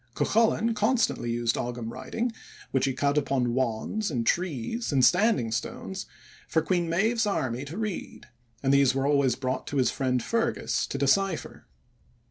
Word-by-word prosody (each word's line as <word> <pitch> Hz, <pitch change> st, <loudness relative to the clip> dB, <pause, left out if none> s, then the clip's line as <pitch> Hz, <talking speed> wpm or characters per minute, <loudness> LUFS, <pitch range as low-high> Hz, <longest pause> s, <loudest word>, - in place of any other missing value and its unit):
Cuchulainn 230 Hz, +1 st, +2 dB
constantly 215 Hz, -, +1 dB
used 115 Hz, 0 st, 0 dB
Ogam 120 Hz, -1 st, -4 dB
writing, 235 Hz, -, -3 dB, 0.4 s
which 135 Hz, 0 st, +2 dB
he 135 Hz, -, 0 dB
cut 140 Hz, +2 st, +1 dB
upon 130 Hz, -4 st, 0 dB
wands 130 Hz, -, -1 dB
and 120 Hz, -6 st, -2 dB
trees 180 Hz, -, -1 dB
and 130 Hz, -3 st, +4 dB
standing 180 Hz, -, +3 dB
stones 190 Hz, +11 st, -4 dB, 0.4 s
for 160 Hz, -, +1 dB
Queen 175 Hz, -3 st, 0 dB
Medb's 220 Hz, +6 st, +1 dB
army 130 Hz, -, -1 dB
to 155 Hz, +6 st, -7 dB
read, 215 Hz, -4 st, -5 dB, 0.4 s
and 135 Hz, 0 st, +3 dB
these 140 Hz, -2 st, +4 dB
were 135 Hz, 0 st, 0 dB
always 140 Hz, -3 st, +3 dB
brought 130 Hz, -1 st, -3 dB
to 145 Hz, -, -3 dB
his 130 Hz, -, +3 dB
friend 125 Hz, -3 st, 0 dB
Fergus 230 Hz, 0 st, 0 dB
to -, -, -4 dB
decipher. 175 Hz, +5 st, 0 dB
140 Hz, 155 wpm, -27 LUFS, 125-200 Hz, 0.4 s, and